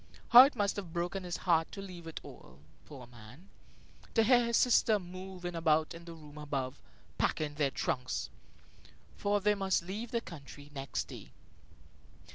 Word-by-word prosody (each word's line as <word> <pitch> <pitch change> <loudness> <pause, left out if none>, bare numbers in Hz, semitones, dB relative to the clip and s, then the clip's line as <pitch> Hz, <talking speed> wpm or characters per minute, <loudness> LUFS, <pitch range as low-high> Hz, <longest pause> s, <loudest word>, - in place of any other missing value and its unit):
How 250 +2 +11
it 280 - -2
must 205 -1 0
have 180 -5 -6
broken 175 +2 -2
his 175 -1 -3
heart 165 -3 +3
to - - -7
leave 180 -4 -8
it 165 - -6
all, 60 - -13 0.3
poor 135 -5 -10
man; 120 - -15 0.7
to 225 - +5
hear 240 +1 +5
his 235 0 +2
sister 225 -3 +4
moving 185 -1 -7
about 160 -2 +2
in 170 0 -11
the 170 -1 -9
room 150 -1 -12
above, 135 -3 -4 0.4
packing 150 -1 0
their 145 -2 +1
trunks! 125 -1 -2 0.8
For 205 0 +1
they 210 +1 +3
must 195 -3 0
leave 205 +6 -5
the 235 - 0
country 145 -6 -11
next 135 -1 -3
day. - - -11
175 Hz, 165 wpm, -32 LUFS, 150-200 Hz, 0.8 s, How